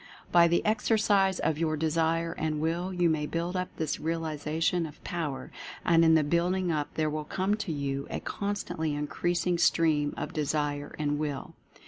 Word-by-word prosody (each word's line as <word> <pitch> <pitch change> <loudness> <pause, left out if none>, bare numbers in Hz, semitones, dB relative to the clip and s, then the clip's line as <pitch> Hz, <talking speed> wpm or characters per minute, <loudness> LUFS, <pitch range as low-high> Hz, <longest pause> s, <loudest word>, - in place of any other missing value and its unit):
By 170 -1 +7
the 170 +1 +1
exercise 210 -3 +3
of 155 -1 0
your 155 -2 0
Desire 165 +1 +1
and 155 -2 -2
Will 170 +4 -1
you 180 -2 +2
may 155 -2 0
build 170 +3 -2
up 180 0 -1
this 155 -1 -2
realization 160 +1 -1
of 150 - -14
Power, 155 -6 -4 0.3
and 165 -1 +5
in 160 0 +6
the 155 - +4
building 175 +4 +1
up 150 -2 -1
there 155 -1 +1
will 155 0 -2
come 190 +6 -1
to 200 -5 -3
you 140 -2 -2
a - - -3
constantly 200 -7 -3
increasing 175 +4 0
stream 155 -4 +3
of - - -4
Desire 145 -1 -1
and 145 -1 -1
Will. 145 -3 -3
160 Hz, 170 wpm, -29 LUFS, 150-175 Hz, 0.3 s, By